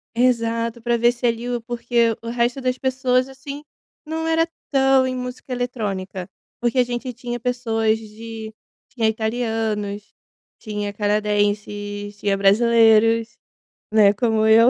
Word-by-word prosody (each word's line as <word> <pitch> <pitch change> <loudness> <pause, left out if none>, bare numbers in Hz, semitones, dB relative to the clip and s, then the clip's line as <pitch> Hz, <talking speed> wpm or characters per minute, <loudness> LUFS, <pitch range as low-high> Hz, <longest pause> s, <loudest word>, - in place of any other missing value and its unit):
Exato. 230 -1 +1
Pra 235 0 +1
ver 235 +1 +4
se 240 +1 -5
ali 235 +1 0
o 240 -1 -2
porque 235 -1 +1
o 230 - -6
resto 240 +2 0
das 255 -1 -1
pessoas 255 0 +1
assim, 275 +2 -8 0.4
não 320 +1 -3
era 325 0 +2 0.2
tão 270 -1 +4
em 255 - -2
música 250 +1 -6
eletrônica. 200 -7 -3 0.3
Porque 240 +1 0
a - - +6
gente 245 +1 -4
tinha 240 0 -5
pessoas 225 -3 0
de 220 0 -9 0.4
tinha 240 -5 0
italianos, 220 -2 -2 0.5
tinha 210 -2 -4
canadenses, 205 0 -1
tinha 200 -1 0
brasileiros, 225 +2 +4 0.6
né, 205 -2 +6
como 220 0 +1
eu 225 +2 +7
230 Hz, 135 wpm, -22 LUFS, 215-245 Hz, 0.6 s, eu